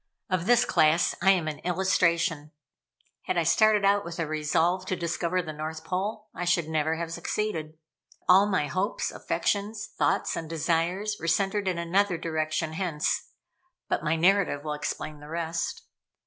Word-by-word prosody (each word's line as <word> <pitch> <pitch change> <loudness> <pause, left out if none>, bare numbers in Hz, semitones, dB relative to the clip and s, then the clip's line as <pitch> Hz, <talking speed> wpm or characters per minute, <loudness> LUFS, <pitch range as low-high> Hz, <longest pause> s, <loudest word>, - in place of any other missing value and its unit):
Of 185 -1 0
this 245 0 +5
class 155 +2 +3
I 190 - +4
am 180 -5 +3
an 155 -1 -4
illustration. 170 -4 +1 0.7
Had - - -1
I 170 - +3
started 210 +5 +4
out 200 +1 +3
with 170 0 -7
a 165 - -1
resolve 155 +4 +1
to 185 - 0
discover 170 +1 -1
the 155 -2 -6
North 155 +1 -5
Pole, 205 +5 -3
I - - -4
should 175 -2 +1
never 160 0 0
have 165 0 -4
succeeded. 160 -7 -3 0.4
But - - -36
all 195 +2 +6
my 185 -7 +1
hopes, 185 +7 -2
affections, 205 +1 -2
thoughts, - - +1
and 160 -2 -5
desires 170 +6 0
were 170 - -5
centered 195 +3 +1
in 180 -2 0
another 180 +2 +1
direction, 155 0 -2
hence 160 -4 -1 0.6
but - - -1
my 155 - +1
narrative 180 -3 +2
will 150 -1 -3
explain 150 0 -4
the 150 +1 -12
rest. 165 0 -3
170 Hz, 165 wpm, -27 LUFS, 160-190 Hz, 0.7 s, all